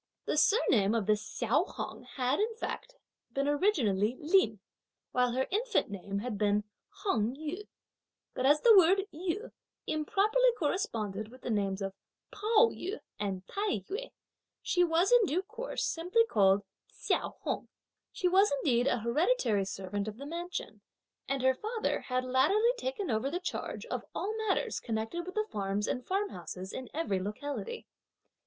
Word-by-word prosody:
The -, -, 0 dB
surname 245 Hz, -, +4 dB
of 220 Hz, -3 st, +1 dB
this 210 Hz, 0 st, +2 dB
Hsiao -, -, +1 dB
Hung -, -, -5 dB
had, 255 Hz, +1 st, +1 dB
in 445 Hz, +2 st, 0 dB
fact, -, -, -5 dB, 0.4 s
been 275 Hz, +1 st, 0 dB
originally 255 Hz, -, +2 dB
Lin, 300 Hz, -, +3 dB, 0.5 s
while 250 Hz, -1 st, +2 dB
her 260 Hz, +1 st, +1 dB
infant 435 Hz, -, +1 dB
name 200 Hz, 0 st, -4 dB
had 210 Hz, -1 st, -3 dB
been 210 Hz, 0 st, +2 dB, 0.3 s
Hung 235 Hz, -, -1 dB
Yü; 315 Hz, +8 st, -5 dB, 0.7 s
but 255 Hz, -, -2 dB
as 290 Hz, +3 st, +5 dB
the 460 Hz, -2 st, +8 dB
word 385 Hz, +1 st, +6 dB
Yü 360 Hz, +7 st, -3 dB, 0.3 s
improperly 430 Hz, +10 st, +2 dB
corresponded 215 Hz, -, -1 dB
with 255 Hz, +3 st, -15 dB
the -, -, -2 dB
names 200 Hz, -2 st, 0 dB
of 195 Hz, 0 st, -3 dB, 0.4 s
Pao 445 Hz, +2 st, +4 dB
yü 390 Hz, +5 st, -5 dB, 0.2 s
and 195 Hz, -2 st, -3 dB
Tai 400 Hz, -, -1 dB
yü, -, -, -4 dB, 0.5 s
she 355 Hz, -, +3 dB
was, 345 Hz, +4 st, +3 dB
in 480 Hz, -5 st, +6 dB
due 350 Hz, +5 st, 0 dB
course, 470 Hz, +5 st, -4 dB
simply 360 Hz, +8 st, +2 dB
called 200 Hz, -, +4 dB, 0.3 s
Hsiao -, -, -1 dB
Hung. -, -, -2 dB, 0.4 s
She 365 Hz, -, 0 dB
was 385 Hz, +3 st, +5 dB
indeed 260 Hz, -3 st, +2 dB
an 245 Hz, -4 st, +1 dB
hereditary 235 Hz, -, +2 dB
servant 195 Hz, +1 st, -4 dB
of 215 Hz, 0 st, -5 dB
the 280 Hz, -, -8 dB
mansion; 345 Hz, +4 st, -5 dB, 0.5 s
and 270 Hz, -1 st, -1 dB
her 260 Hz, 0 st, +5 dB
father 435 Hz, -, -2 dB
had 255 Hz, 0 st, -2 dB
latterly 345 Hz, -, +3 dB
taken 475 Hz, -, -3 dB
over 220 Hz, +5 st, 0 dB
the 350 Hz, +5 st, -2 dB
charge 365 Hz, -, -4 dB
of -, -, -4 dB
all 415 Hz, +3 st, -2 dB
matters 385 Hz, -, 0 dB
connected 225 Hz, +10 st, -3 dB
with 370 Hz, -, -7 dB
the 430 Hz, 0 st, +1 dB
farms 200 Hz, +1 st, -1 dB
and 250 Hz, -, -2 dB
farmhouses 190 Hz, -, -3 dB
in 260 Hz, -2 st, -6 dB
every 290 Hz, -, -1 dB
locality. 285 Hz, -, -5 dB
290 Hz, 160 wpm, -31 LUFS, -, 0.7 s, the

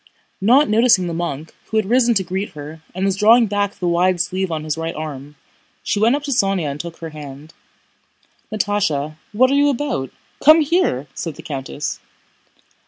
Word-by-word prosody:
Not 250 Hz, +9 st, +5 dB
noticing 220 Hz, -3 st, +4 dB
the 170 Hz, -, -3 dB
monk, 160 Hz, -2 st, -4 dB
who 220 Hz, -, -2 dB
had 215 Hz, -, +2 dB
risen 240 Hz, +2 st, +3 dB
to 195 Hz, -, +2 dB
greet 190 Hz, +3 st, -4 dB
her 150 Hz, +1 st, -9 dB
and 190 Hz, +1 st, -1 dB
was 195 Hz, -1 st, +1 dB
drawing 225 Hz, +4 st, +5 dB
back 205 Hz, -1 st, -1 dB
the 180 Hz, -, -3 dB
wide 175 Hz, +1 st, +2 dB
sleeve 185 Hz, +1 st, -1 dB
on 155 Hz, -1 st, -3 dB
his 155 Hz, -1 st, -2 dB
right 165 Hz, +1 st, -4 dB
arm, 150 Hz, -2 st, -7 dB, 0.5 s
she 205 Hz, -, -1 dB
went 230 Hz, +5 st, +4 dB
up 290 Hz, -, -4 dB
to 290 Hz, -, -4 dB
Sónya 195 Hz, -, +1 dB
and 140 Hz, -, -7 dB
took 170 Hz, 0 st, -7 dB
her 165 Hz, -, -7 dB
hand. 150 Hz, 0 st, -10 dB, 1.0 s
"Natásha, 185 Hz, -9 st, -1 dB
what 255 Hz, +5 st, +3 dB
are -, -, +2 dB
you 285 Hz, +1 st, +4 dB
about? 265 Hz, -, -2 dB, 0.3 s
Come 310 Hz, +2 st, +8 dB
here!" 300 Hz, -, +1 dB
said 165 Hz, -4 st, -5 dB
the -, -, -11 dB
countess. 140 Hz, 0 st, -5 dB
185 Hz, 185 wpm, -20 LUFS, 155-225 Hz, 1.0 s, Come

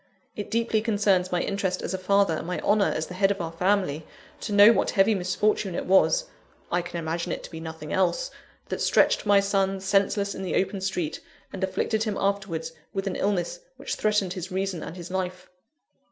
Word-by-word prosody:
It 205 Hz, -, -5 dB
deeply 230 Hz, -1 st, +1 dB
concerns 200 Hz, -4 st, +2 dB
my 175 Hz, -1 st, +1 dB
interest 195 Hz, -2 st, -2 dB
as -, -, -3 dB
a -, -, -1 dB
father, 200 Hz, -1 st, +3 dB
and 160 Hz, -, -4 dB
my 180 Hz, -, -2 dB
honour 205 Hz, 0 st, +3 dB
as 155 Hz, -, -2 dB
the 180 Hz, -, -9 dB
head 195 Hz, +1 st, +2 dB
of 200 Hz, 0 st, -1 dB
our 165 Hz, -2 st, -3 dB
family, 180 Hz, -3 st, 0 dB, 0.4 s
to 210 Hz, -, -5 dB
know 205 Hz, +2 st, +8 dB
what -, -, +1 dB
heavy 195 Hz, +3 st, +4 dB
misfortune 190 Hz, 0 st, 0 dB
it -, -, -3 dB
was 345 Hz, -, +4 dB, 0.5 s
(I 175 Hz, -, +2 dB
can 175 Hz, 0 st, -6 dB
imagine 165 Hz, +1 st, -3 dB
it -, -, -4 dB
to -, -, -10 dB
be 160 Hz, -, -7 dB
nothing 160 Hz, -2 st, -7 dB
else) -, -, +1 dB, 0.4 s
that -, -, -3 dB
stretched -, -, +3 dB
my 205 Hz, -1 st, +6 dB
son 195 Hz, -1 st, +1 dB
senseless 200 Hz, +1 st, +1 dB
in -, -, -7 dB
the 190 Hz, -, -2 dB
open 195 Hz, 0 st, 0 dB
street, 180 Hz, -5 st, -2 dB, 0.3 s
and 190 Hz, -, -4 dB
afflicted 215 Hz, +4 st, 0 dB
him 210 Hz, -2 st, -2 dB
afterwards 195 Hz, -5 st, -1 dB, 0.2 s
with 195 Hz, 0 st, -3 dB
an 195 Hz, -, -2 dB
illness 200 Hz, -, -1 dB, 0.2 s
which -, -, -4 dB
threatened 210 Hz, -4 st, +1 dB
his 185 Hz, +1 st, -6 dB
reason 190 Hz, -2 st, -2 dB
and 175 Hz, -, -7 dB
his 175 Hz, 0 st, -8 dB
life. 185 Hz, -1 st, -4 dB
195 Hz, 205 wpm, -26 LUFS, 180-200 Hz, 0.5 s, know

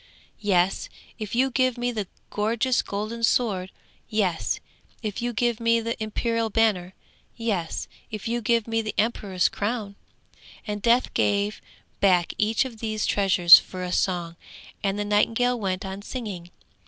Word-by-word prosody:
'Yes, 190 Hz, -3 st, +1 dB, 0.3 s
if 215 Hz, 0 st, -4 dB
you 260 Hz, +2 st, +2 dB
give 255 Hz, -1 st, +1 dB
me 245 Hz, 0 st, -1 dB
the 210 Hz, -5 st, -3 dB, 0.2 s
gorgeous 230 Hz, +4 st, +1 dB
golden 215 Hz, +3 st, -4 dB
sword; 205 Hz, -6 st, +1 dB, 0.4 s
yes, 195 Hz, -6 st, 0 dB, 0.4 s
if 215 Hz, +1 st, -3 dB
you 240 Hz, 0 st, -1 dB
give 240 Hz, 0 st, 0 dB
me 230 Hz, 0 st, +3 dB
the 230 Hz, +1 st, -2 dB
imperial 230 Hz, +1 st, -1 dB
banner; 200 Hz, -5 st, +1 dB, 0.4 s
yes, 205 Hz, -8 st, -2 dB, 0.2 s
if 215 Hz, -1 st, -5 dB
you 235 Hz, +1 st, -1 dB
give 230 Hz, 0 st, +1 dB
me 225 Hz, 0 st, 0 dB
the 215 Hz, -2 st, -5 dB
emperor's 200 Hz, -4 st, +1 dB
crown.' 210 Hz, -1 st, -3 dB, 0.7 s
And 210 Hz, -1 st, -4 dB
Death 240 Hz, +3 st, +3 dB
gave 205 Hz, +1 st, +1 dB, 0.4 s
back 180 Hz, -3 st, +3 dB
each 220 Hz, +4 st, +2 dB
of 235 Hz, -4 st, -8 dB
these 215 Hz, -1 st, -2 dB
treasures 180 Hz, -4 st, +7 dB
for 185 Hz, -1 st, -7 dB
a 180 Hz, -, -3 dB
song, 175 Hz, -3 st, -1 dB, 0.5 s
and 195 Hz, 0 st, 0 dB
the 205 Hz, -, -2 dB
nightingale 230 Hz, +4 st, +2 dB
went 190 Hz, -2 st, -2 dB
on 190 Hz, +1 st, -6 dB
singing. 205 Hz, -7 st, -6 dB
215 Hz, 150 wpm, -25 LUFS, 195-230 Hz, 0.7 s, treasures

